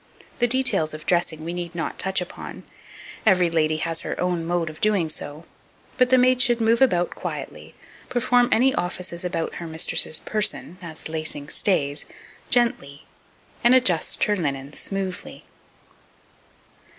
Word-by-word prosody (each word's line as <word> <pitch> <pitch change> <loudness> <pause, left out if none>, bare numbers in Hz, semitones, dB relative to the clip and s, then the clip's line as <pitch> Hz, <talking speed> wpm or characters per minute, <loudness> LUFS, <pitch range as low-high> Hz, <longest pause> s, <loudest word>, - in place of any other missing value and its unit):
The 240 - +4
details 245 -12 +1
of 155 - -10
dressing 165 -3 0
we 170 - -4
need 175 -1 -5
not 165 - -4
touch 190 -1 +2
upon, 180 - -8 0.6
every 180 -5 +4
lady 155 -1 +1
has 165 +1 -1
her - - -5
own 180 -2 0
mode 170 0 -1
of 155 0 -9
doing 200 -6 +2
so; 155 +1 -6 0.5
but 255 -1 +3
the 260 - +5
maid 255 0 +4
should 240 -1 +4
move 230 +1 +2
about 180 -10 +3
quietly, - - -7 0.3
perform 245 0 +2
any 260 +3 +4
offices 180 -1 -3
about 175 -2 -2
her 170 - -5
mistress's 160 0 +2
person, 210 -4 0
as 160 -3 -7
lacing 155 -2 -3
stays, 145 -6 0 0.4
gently, 150 - 0 0.6
and 240 +2 +6
adjust 190 -11 +2
her 210 - +2
linen 140 -5 -3
smoothly. 195 0 -5
175 Hz, 145 wpm, -23 LUFS, 160-225 Hz, 0.6 s, and